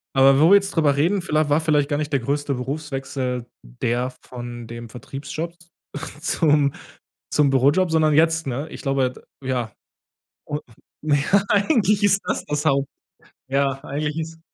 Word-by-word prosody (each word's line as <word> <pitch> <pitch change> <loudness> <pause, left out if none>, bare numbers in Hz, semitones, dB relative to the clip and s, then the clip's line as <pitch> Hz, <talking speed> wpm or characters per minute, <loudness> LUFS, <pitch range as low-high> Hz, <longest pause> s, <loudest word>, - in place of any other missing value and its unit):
Aber 135 +1 +6
wo 160 - +6
wir 200 - +9
jetzt 200 0 0
drüber 150 -4 +3
reden, 175 +7 +2
vielleicht 155 -3 +1
war 145 +2 +4
vielleicht 150 -3 +2
gar 145 - 0
nicht 150 0 -3
der 140 - +3
größte 140 +3 -1
Berufswechsel 135 -2 -3 0.2
der 120 - -2
von 120 -1 -8
dem 115 0 -8
Vertriebsjob 140 +7 -6 0.7
zum 150 -4 +2 0.6
zum 145 -2 +3
Bürojob, 145 +7 +3
sondern 155 -1 +3
jetzt, 160 0 +3
ne? 135 +4 -3
Ich - - -9
glaube, 135 -3 +1
d - - -15 0.3
ja. 125 -4 -1 0.8
Un 150 0 -2 0.4
ja, 155 +6 +2
eigentlich 205 - +3
ist 200 -1 +4
das, - - -1
das 150 +1 -2
Haupt 140 -2 +2 0.6
ja, 135 0 0
eigentlich 150 +2 -3
ist 160 0 -6
145 Hz, 155 wpm, -22 LUFS, 135-160 Hz, 0.8 s, wir